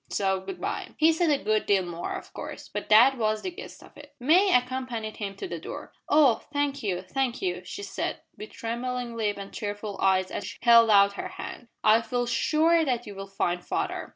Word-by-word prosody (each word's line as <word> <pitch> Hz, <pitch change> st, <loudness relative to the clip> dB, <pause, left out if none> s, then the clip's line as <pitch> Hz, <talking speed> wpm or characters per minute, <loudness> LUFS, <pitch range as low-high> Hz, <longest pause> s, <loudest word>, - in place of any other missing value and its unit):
So 190 Hz, -1 st, 0 dB
good 270 Hz, -, -8 dB
bye." -, -, -3 dB
He 315 Hz, +1 st, +5 dB
said 330 Hz, 0 st, +1 dB
a 285 Hz, -2 st, +1 dB
good 215 Hz, 0 st, +1 dB
deal 195 Hz, -2 st, +3 dB
more, 175 Hz, 0 st, -5 dB
of -, -, -9 dB
course, -, -, -8 dB
but -, -, -6 dB
that 240 Hz, +5 st, +6 dB
was 215 Hz, -1 st, 0 dB
the 370 Hz, -, -3 dB
gist -, -, -11 dB
of -, -, -17 dB
it. 290 Hz, 0 st, -14 dB
May 350 Hz, +10 st, +4 dB
accompanied 250 Hz, -3 st, -1 dB
him 200 Hz, -2 st, -5 dB
to 385 Hz, -, -6 dB
the -, -, -5 dB
door. -, -, -8 dB, 0.2 s
"Oh! 285 Hz, -7 st, +5 dB
thank 285 Hz, -1 st, -1 dB
you 185 Hz, -4 st, -2 dB
thank 245 Hz, +6 st, -2 dB
you!" 370 Hz, -2 st, -2 dB
she 405 Hz, -, -7 dB
said, -, -, -3 dB, 0.2 s
with 215 Hz, -, -9 dB
trembling 240 Hz, +1 st, -4 dB
lip 210 Hz, -3 st, -1 dB
and 200 Hz, 0 st, -8 dB
tearful 205 Hz, -1 st, -5 dB
eyes 185 Hz, -1 st, +2 dB
as 195 Hz, -, -4 dB
she -, -, -8 dB
held 235 Hz, -1 st, +7 dB
out 200 Hz, -1 st, +6 dB
her -, -, -4 dB
hand, 240 Hz, -, -8 dB, 0.2 s
"I 220 Hz, +2 st, +5 dB
feel 245 Hz, +1 st, -2 dB
sure 320 Hz, +7 st, +2 dB
that 250 Hz, -4 st, -1 dB
you 205 Hz, -, -8 dB
will 195 Hz, 0 st, -8 dB
find 175 Hz, -2 st, -2 dB
father." -, -, -3 dB
230 Hz, 215 wpm, -27 LUFS, 205-275 Hz, 0.2 s, held